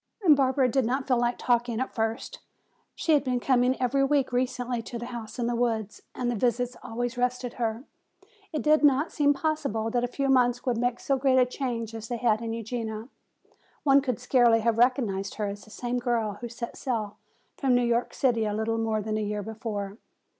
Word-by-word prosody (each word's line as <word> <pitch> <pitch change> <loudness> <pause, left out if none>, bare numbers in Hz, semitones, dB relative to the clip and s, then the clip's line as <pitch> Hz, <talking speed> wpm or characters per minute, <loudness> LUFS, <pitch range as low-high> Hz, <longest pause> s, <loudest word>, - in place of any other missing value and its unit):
Barbara 270 -2 +5
did 265 +2 +1
not 260 +4 -1
feel 250 -3 +3
like 240 0 +1
talking 240 -1 +1
at 260 - -3
first. 225 +1 -3 0.6
She 320 - +1
had 290 - +4
been 250 -2 0
coming 250 0 +2
every 260 +2 +2
week 275 -1 +2
recently 245 -1 -1
to 235 +1 -7
the 235 - -6
house 235 -2 -7
in 240 - -1
the 240 0 0
woods 225 -3 -1
and 245 -1 -1
the - - -2
visits 245 +2 0
always 245 +2 -4
rested 250 0 -1
her. 225 +1 -1 0.7
It 305 - -2
did 305 0 +4
not 290 +2 +4
seem 290 -2 +3
possible 275 -8 -1
that 245 0 +1
a - - +1
few 275 +2 -2
months 245 -2 +3
could 245 -2 -1
make 245 0 0
so 275 - 0
great 265 -1 +3
a 255 - +6
change 240 -3 -4
as 225 0 -6
they 240 - -3
had 225 -2 +2
in 230 -1 -3
Eugenia. 225 0 -4 0.7
One 280 -1 +5
could 255 -4 -2
scarcely 245 -2 +4
have 230 0 +1
recognized 225 -6 +1
her 210 - -2
as 200 0 -6
the - - -17
same 245 +3 -3
girl 230 -4 -1
who 240 - -5
set 235 0 -6
sail 220 -6 -3 0.4
from 265 -3 +2
New 245 0 +3
York 235 0 0
City 235 -5 +2
a 210 -1 -1
little 225 +1 -1
more 220 -1 0
than 215 0 -2
a - - -1
year 210 0 -2
before. 210 -1 -5
240 Hz, 210 wpm, -27 LUFS, 225-255 Hz, 0.7 s, a